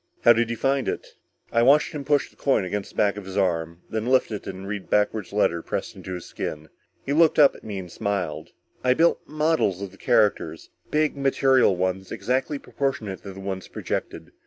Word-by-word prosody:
"How 120 - +8
did 115 0 +1
you 115 - -3
find 135 +1 +1
it?" - - -4 0.4
I 115 - +3
watched 140 +5 +5
him 150 -3 -5
push 145 +1 +1
the - - -26
coin 135 -8 +1
against 100 +2 -3
the - - -19
back 100 -1 +2
of 105 - -7
his 95 +1 -6
arm, 85 -3 0
then 110 +1 -3
lift 130 -2 +3
it 105 - -3
to - - -3
read 95 +1 -6
the - - -28
backward 105 -2 +1
letters 85 -5 +1
pressed - - -3
into 95 - -6
his 90 - -7
skin. 75 0 -6 0.4
He 140 - -1
looked 160 +1 +4
up 145 -3 +7
at - - -14
me 105 -2 -5
and 90 -2 -7
smiled. 90 -7 -3 0.3
"I 125 0 +4
built 170 +3 +3
models 155 - +1
of 100 -2 -6
the 95 - -17
characters. 105 -1 +1 0.2
Big 155 0 +1
material 135 -5 +3
ones, 95 +1 -2
exactly 130 +8 -1
proportionate 135 -9 -3
to 100 - -8
the 95 - -10
ones 95 -1 -5
projected. - - -5
105 Hz, 210 wpm, -24 LUFS, 95-135 Hz, 0.4 s, How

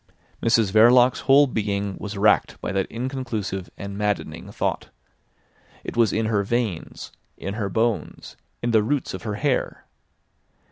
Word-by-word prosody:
Mrs 115 -3 +3
Verloc's 120 +4 +6
whole 140 +2 +5
being 100 -5 -2
was 105 0 -6
racked 105 +2 +2
by - - -4
that 95 0 0
inconclusive 115 -7 -4
and 100 0 -6
maddening 105 -1 -3
thought. - - -2 0.9
It - - -6
was 115 -4 +3
in 110 +1 0
her 110 -2 +1
veins, 110 -5 -3 0.3
in 100 - -5
her 105 -2 -3
bones, 110 +2 -2 0.3
in 120 - +1
the 110 -2 +4
roots 135 +5 -1
of - - -6
her 105 -2 -4
hair. 135 +3 -1
110 Hz, 145 wpm, -23 LUFS, 100-120 Hz, 0.9 s, Verloc's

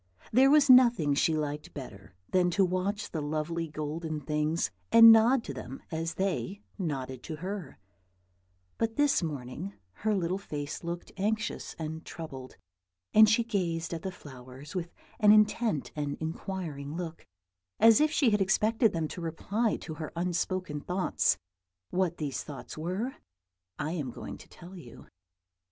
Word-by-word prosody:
There 265 +4 +6
was 295 0 +6
nothing 240 - +6
she 155 +3 +2
liked 150 -1 -4
better 100 -9 -9 0.2
than 180 -1 +3
to 195 - +5
watch 190 +3 -2
the 160 - -3
lovely 155 +3 -2
golden 155 +1 -4
things, 150 +3 -1 0.2
and 230 0 +10
nod 230 +3 +5
to 140 - -6
them 130 0 -8
as 165 +1 -3
they 195 +1 -2 0.2
nodded 130 -7 -3
to 160 - -6
her; 180 -2 -6 1.0
but 225 0 0
this 290 -5 +3
morning 155 +4 -5 0.3
her 215 -1 +2
little 185 0 -1
face 145 -6 -5
looked 170 +1 -5
anxious 215 +2 -2
and 160 0 -5
troubled, 135 -6 -8 0.6
and 215 0 +8
she 230 +2 +3
gazed 175 -7 -2
at 165 - -4
the 190 - -4
flowers 130 -2 -11
with 175 -2 -3 0.3
an 210 -2 +7
intent 215 - +3
and 145 -1 -3
inquiring 160 -3 -5
look, 170 -2 -6 0.6
as 225 +5 +7
if 305 - +4
she 285 -6 +3
had 210 -1 +2
expected 215 +4 +3
them 165 -2 -1
to 175 - -7
reply 200 +7 -1
to 160 - -6
her 155 0 -6
unspoken 175 -2 -2
thoughts. 180 +4 +1 0.5
What 180 -2 0
these 145 -4 -3
thoughts 145 -3 -9
were 185 +11 -3 0.6
I 155 +1 -2
am 150 -7 -3
going - - -8
to - - -15
tell 180 +2 -12
you. 125 -8 -12
170 Hz, 155 wpm, -29 LUFS, 150-205 Hz, 1.0 s, and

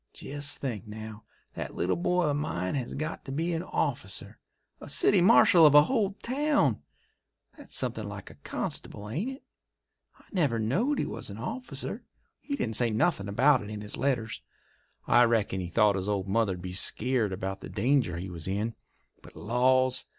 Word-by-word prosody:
Jest 145 +1 -5
think, 115 -6 -4
now, 110 0 -8 0.3
that - - -6
little 90 - +1
boy 180 +1 +1
of 150 -3 +1
mine 90 - -2
has 130 -4 -3
got 155 +3 -4
to 135 - -6
be 165 +5 -1
a 165 +1 -2
officer—a - - -5
city 200 -3 +4
marshal 180 -3 +7
of 150 -2 +7
a 145 - +10
whole 210 - 0
town! 260 - +1 0.7
That's - - -8
somethin' - - -1
like - - -8
a - - -19
constable, 105 - -4
ain't 165 - -2
it? 270 +1 -9 0.7
I - - -22
never 145 -11 +1
knowed 180 - +1
he - - 0
was - - -6
a 100 - -7
officer; 250 - -5 0.4
he 285 - -4
didn't 110 - 0
say 120 -2 +2
nothin' 110 - +1
about 130 +6 +4
it 105 - -8
in 105 -1 -6
his 105 0 -5
letters. 120 -4 -1 0.6
I 120 0 +6
reckon 110 -5 +1
he 90 - -3
thought 105 +2 +3
his 95 +1 -2
old 100 -2 -1
mother'd 95 -3 0
be 90 -1 -5
skeered 115 +3 0
about 95 +1 -4
the - - -9
danger 115 -5 +1
he 90 +2 -6
was 85 -1 -6
in. 105 +4 -1 0.5
But, - - -15
laws! 130 +3 +2
120 Hz, 180 wpm, -28 LUFS, 105-155 Hz, 0.7 s, a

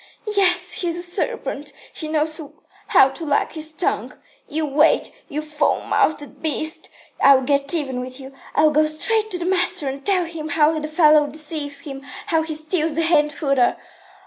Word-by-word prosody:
"Yes, 360 -2 +3
he's 345 -2 -2
a 350 - -1
serpent. 295 -4 -3 0.2
He 315 - -6
knows 310 +1 -1 0.5
how 270 0 +5
to 300 +5 -9
wag 290 -2 0
his 315 0 -1
tongue. 320 +3 -2 0.3
You 310 +1 -2
wait, 295 +2 +2 0.2
you 300 +2 -4
foul 300 -1 0
mouthed 290 -2 -1
beast, 315 +1 -1 0.3
I'll 275 -1 +6
get 280 +3 +2
even 265 -6 -2
with 255 +1 -7
you. 270 0 -11 0.2
I'll 305 0 +4
go 305 +1 +3
straight 435 +8 +1
to 365 - -1
the 345 - -4
master 360 -5 +1
and 270 +1 -5
tell 370 -1 +1
him 325 -2 -7
how 310 +1 +2
the 305 - -4
fellow 305 -1 +4
deceives 295 -1 -3
him, 275 -2 -8 0.2
how 330 -6 +1
he 315 -1 -4
steals 310 0 -1
the 330 - +1
hay 330 -1 +4
and 295 0 -1
fodder. 275 -5 +1
310 Hz, 180 wpm, -21 LUFS, 285-330 Hz, 0.5 s, I'll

